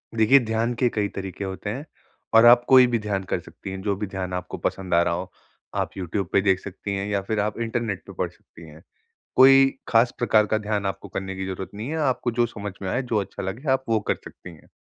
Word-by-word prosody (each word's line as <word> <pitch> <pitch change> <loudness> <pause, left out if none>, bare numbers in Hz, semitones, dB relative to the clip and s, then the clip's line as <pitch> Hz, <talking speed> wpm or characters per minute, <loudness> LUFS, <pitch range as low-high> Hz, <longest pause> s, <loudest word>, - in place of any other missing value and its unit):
देखिए, 115 +5 +6
ध्यान 115 0 -1
के 125 +1 +1
कई 105 -3 -1
तरीके 95 0 -5
होते 95 +1 -5
हैं। 135 +8 -5 0.5
और 115 +1 +7
आप 120 +1 +8
कोई 130 -1 +7
भी 120 -1 0
ध्यान 100 -2 -2
कर - - -2
सकती 95 - -10
हैं, 95 0 -6
जो 100 0 0
भी 105 +2 -4
ध्यान 95 -1 -5
आपको 90 -1 -4
पसंद 95 -2 -3
आ 85 - +5
रहा 85 - 0
हो। 90 +2 -5 0.4
आप - - 0
यूट्यूब 95 0 -3
पे 100 - +5
देख 95 -1 +2
सकती 100 +1 -6
हैं 100 +1 -3
या 100 -1 0
फ़िर 105 +2 -2
आप 105 +2 -1
इंटरनेट 115 -5 -2
पे - - -9
पढ़ - - -2
सकती 85 0 -16
हैं। 75 +2 -14 0.6
कोई 135 +1 +8 0.2
ख़ास 120 +1 +4
प्रकार 110 -3 +3
का 110 - +1
ध्यान 105 -1 -2
आपको 95 - -4
करने 95 0 -5
की 95 - -4
ज़रूरत 95 0 -5
नहीं 110 +5 -5
है। 160 - -3
आपको 125 -1 -1
जो 120 - +4
समझ 105 -3 -7
में 95 - -3
आए, 125 +8 0
जो 120 -3 -2
अच्छा 100 - -6
लगे 115 +10 -3
आप 130 0 0
वो 110 -1 +2
कर - - +3
सकती 85 - -11
हैं। 75 - -20
105 Hz, 245 wpm, -24 LUFS, 95-115 Hz, 0.6 s, आप